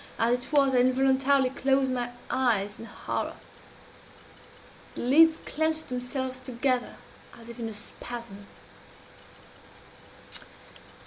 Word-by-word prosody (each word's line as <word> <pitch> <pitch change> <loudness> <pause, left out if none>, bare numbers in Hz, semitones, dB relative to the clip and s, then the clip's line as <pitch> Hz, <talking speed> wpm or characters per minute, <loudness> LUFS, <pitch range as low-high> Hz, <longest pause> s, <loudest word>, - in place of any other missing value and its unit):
As 230 +1 +3
it 250 - -10
was, 275 -3 +4
I 250 - +4
involuntarily 265 +1 +3
closed 270 0 +2
my 245 -1 -1 0.2
eyes 210 -6 +1
in 230 - -8
horror. - - -4 1.6
The - - -4
lids 320 +6 +6
clenched 315 0 -1
themselves 255 +1 -3
together 255 0 -1 0.4
as 230 0 -12
if 235 +1 -9
in 225 -1 -3
a - - -7
spasm. 210 -1 -9
255 Hz, 110 wpm, -28 LUFS, 240-270 Hz, 1.6 s, lids